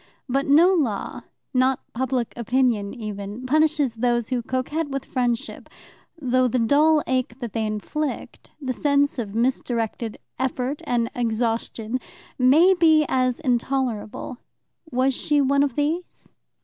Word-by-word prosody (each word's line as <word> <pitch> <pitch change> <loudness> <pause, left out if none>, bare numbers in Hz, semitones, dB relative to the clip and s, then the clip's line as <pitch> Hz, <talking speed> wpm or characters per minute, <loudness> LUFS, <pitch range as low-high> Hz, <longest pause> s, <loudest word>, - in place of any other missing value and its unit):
But 275 +2 0
no 330 +7 +6
law 255 - -1 0.3
not 255 0 +2
public 250 -1 -1
opinion 235 -4 +1
even 210 0 -6
punishes 300 -2 +2
those 240 0 0
who 250 -2 0
coquette 265 +6 -2
with 275 -1 -4
friendship, 245 -3 -2 0.5
though 255 -2 +2
the 250 - 0
dull 295 +6 +4
ache 255 -2 -1
that 240 -5 -6
they 220 -2 -1
inflict, 265 +8 -4
the 260 -3 -3
sense 285 +1 +1
of 210 -3 -4
misdirected 230 -2 -1 0.2
effort 260 +2 -2
and 235 -1 0
exhaustion, 230 0 -1 0.4
may 305 +9 +6
be 315 -4 +4
as 255 -1 +1
intolerable. 245 -2 -2 0.5
Was 260 +1 +1
she 295 +3 +1
one 280 0 +3
of 280 -4 0
these? 315 +5 -3
255 Hz, 130 wpm, -23 LUFS, 235-280 Hz, 0.5 s, no